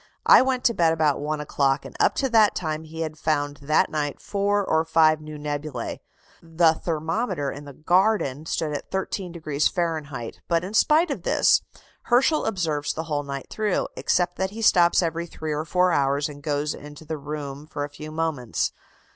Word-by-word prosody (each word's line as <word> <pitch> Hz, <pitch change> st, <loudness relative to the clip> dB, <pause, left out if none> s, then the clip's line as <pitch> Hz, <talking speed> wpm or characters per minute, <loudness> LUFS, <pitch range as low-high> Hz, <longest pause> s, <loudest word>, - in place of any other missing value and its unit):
I -, -, +8 dB
went 260 Hz, -1 st, 0 dB
to 235 Hz, -, +3 dB
bed 165 Hz, -5 st, +3 dB
about 155 Hz, -3 st, +1 dB
one 150 Hz, +1 st, -2 dB
o'clock, 140 Hz, -2 st, 0 dB
and -, -, -10 dB
up -, -, +3 dB
to 270 Hz, -, 0 dB
that 220 Hz, -3 st, +4 dB
time 155 Hz, -2 st, -3 dB
he 160 Hz, +1 st, -7 dB
had 155 Hz, -1 st, -4 dB
found 145 Hz, -2 st, -1 dB
that 145 Hz, +2 st, +1 dB
night 145 Hz, -2 st, -2 dB
four 205 Hz, 0 st, 0 dB
or 160 Hz, -2 st, +2 dB
five 155 Hz, -1 st, +3 dB
new 155 Hz, 0 st, -8 dB
nebulæ. 145 Hz, -4 st, -4 dB, 0.4 s
The 165 Hz, 0 st, +3 dB
thermometer 165 Hz, -, -2 dB
in 145 Hz, +1 st, -9 dB
the 140 Hz, -, -10 dB
garden 165 Hz, -2 st, +1 dB
stood 155 Hz, -2 st, -1 dB
at 145 Hz, -, -5 dB
13° 170 Hz, -6 st, -2 dB
Fahrenheit; 155 Hz, -8 st, -3 dB
but, 170 Hz, -1 st, +1 dB
in 190 Hz, +3 st, -6 dB
spite 310 Hz, +8 st, +4 dB
of -, -, -3 dB
this, -, -, +3 dB, 0.4 s
Herschel 265 Hz, +6 st, +3 dB
observes 160 Hz, -8 st, -1 dB
the 160 Hz, -, -4 dB
whole 150 Hz, -3 st, -2 dB
night 140 Hz, -1 st, -7 dB
through, 215 Hz, -3 st, -1 dB
except 180 Hz, 0 st, 0 dB
that 190 Hz, 0 st, 0 dB
he 225 Hz, +3 st, -7 dB
stops 175 Hz, -3 st, +5 dB
every 170 Hz, +1 st, -2 dB
three 155 Hz, -2 st, -5 dB
or 150 Hz, +1 st, -2 dB
four 180 Hz, +2 st, +2 dB
hours 140 Hz, -1 st, +1 dB
and 145 Hz, -1 st, -10 dB
goes 145 Hz, 0 st, -1 dB
into 150 Hz, +1 st, -11 dB
the 155 Hz, 0 st, -4 dB
room 145 Hz, 0 st, -6 dB
for 145 Hz, -2 st, -4 dB
a 145 Hz, -, -4 dB
few 155 Hz, +1 st, -9 dB
moments. 155 Hz, -7 st, -2 dB
155 Hz, 190 wpm, -24 LUFS, 145-180 Hz, 0.4 s, I